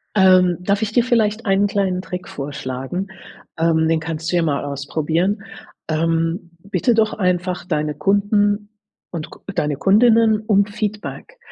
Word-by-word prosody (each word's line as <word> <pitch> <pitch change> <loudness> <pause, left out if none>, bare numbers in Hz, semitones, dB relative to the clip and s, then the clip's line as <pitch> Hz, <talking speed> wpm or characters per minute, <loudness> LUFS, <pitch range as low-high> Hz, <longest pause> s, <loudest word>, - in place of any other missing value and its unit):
Ähm, 185 -3 +5
darf 200 +3 0
ich 220 0 -1
dir 240 0 +3
vielleicht 225 -3 +1
einen 195 +1 +3
kleinen 190 -2 -1
Trick 180 -1 -7
vorschlagen? 140 +5 -5 0.5
Ähm, 160 -1 +2
den 160 0 +2
kannst 160 0 -4
du - - +2
ja 170 - +3
mal 145 -3 -1
ausprobieren. 160 +8 -1 0.4
Ähm, 165 +2 -1
bitte 220 +5 0
doch 220 -1 +2
einfach 180 -2 -1
deine 150 -3 -1
Kunden 205 +4 +1 0.4
und 165 -3 -6
k - - -14
deine 150 -4 -1
Kundinnen 220 - +4
um 210 -2 +3
Feedback. 210 - -5
185 Hz, 145 wpm, -20 LUFS, 160-205 Hz, 0.5 s, Ähm